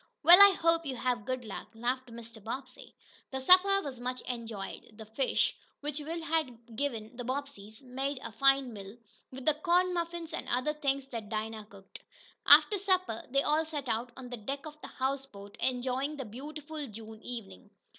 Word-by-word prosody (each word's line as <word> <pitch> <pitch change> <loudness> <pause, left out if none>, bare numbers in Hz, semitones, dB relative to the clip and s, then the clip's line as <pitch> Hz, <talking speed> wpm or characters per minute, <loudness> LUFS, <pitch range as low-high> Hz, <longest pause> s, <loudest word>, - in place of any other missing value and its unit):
"Well, 355 +3 +10
I 400 -1 +10
hope 330 -1 +2
you 265 - -3
have 245 -4 -1
good 255 -2 -3
luck," 210 - -7
laughed 250 +3 -2
Mr. 230 -2 -10
Bobbsey. 255 +3 -7 0.3
The 265 - -4
supper 375 +7 +6
was 265 -4 -6
much 250 +1 -3
enjoyed. 225 -3 -6
The 220 - -9
fish, 225 +5 +1 0.3
which 295 0 -3
Will 325 +3 -5
had 250 -8 -2
given 230 -4 -3
the 245 - -4
Bobbseys, 255 -4 -6
made 265 +2 -3
a - - -6
fine 270 +1 +3
meal, 200 +1 -9 0.3
with 265 0 -9
the 310 - +5
corn 355 +4 +2
muffins 340 -1 -3
and - - -5
other 255 +5 +1
things 275 -2 -1
Dinah 220 -3 -5
cooked. 195 -1 -13 0.5
After 415 -3 +8
supper 370 - 0
they 275 +2 +2
all 305 +2 +2
sat 300 -4 -5
out 240 +1 -2
on 260 -1 -8
the 245 - -5
deck 275 +7 -5
of 305 0 -10
the - - -7
houseboat, 260 -7 -4
enjoying 260 +3 -1
the 270 - -5
beautiful 295 +6 -7
June 220 0 -10
evening. 225 -4 -8
260 Hz, 175 wpm, -31 LUFS, 230-300 Hz, 0.5 s, Well